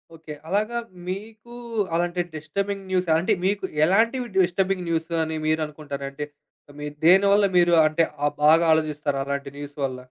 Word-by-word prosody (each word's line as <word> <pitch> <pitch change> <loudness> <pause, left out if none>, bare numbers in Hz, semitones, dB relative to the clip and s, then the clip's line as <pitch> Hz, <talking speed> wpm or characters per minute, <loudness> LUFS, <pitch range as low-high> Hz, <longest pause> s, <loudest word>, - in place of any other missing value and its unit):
Okay. 160 -1 -9 0.2
అలాగా 215 +5 0 0.3
మీకూ 220 +5 -7 0.4
అలాంటి 175 +1 0
డిస్టర్బింగ్ 195 +6 -4
న్యూస్ 185 -1 +1
అంటే 185 +6 +1
మీకు 200 0 0 0.2
ఎలాంటివి 230 +8 +2
డిస్టర్బింగ్ 185 +1 0
న్యూసని 160 -1 -1
మీరనుకుంటారంటే 150 -2 -3 0.5
మీరు 150 0 -6
దేనివల్ల 200 +3 +6
మీరు 175 0 +4
అంటే 155 +2 +2 0.2
ఆ - - +4 0.2
బాగా 160 +2 +6
ఆలోజిస్తారు 150 -3 0
అలాంటి 140 0 -3
న్యూస్ 145 0 -8
వల్ల? 130 -2 -2
170 Hz, 130 wpm, -24 LUFS, 150-195 Hz, 0.5 s, దేనివల్ల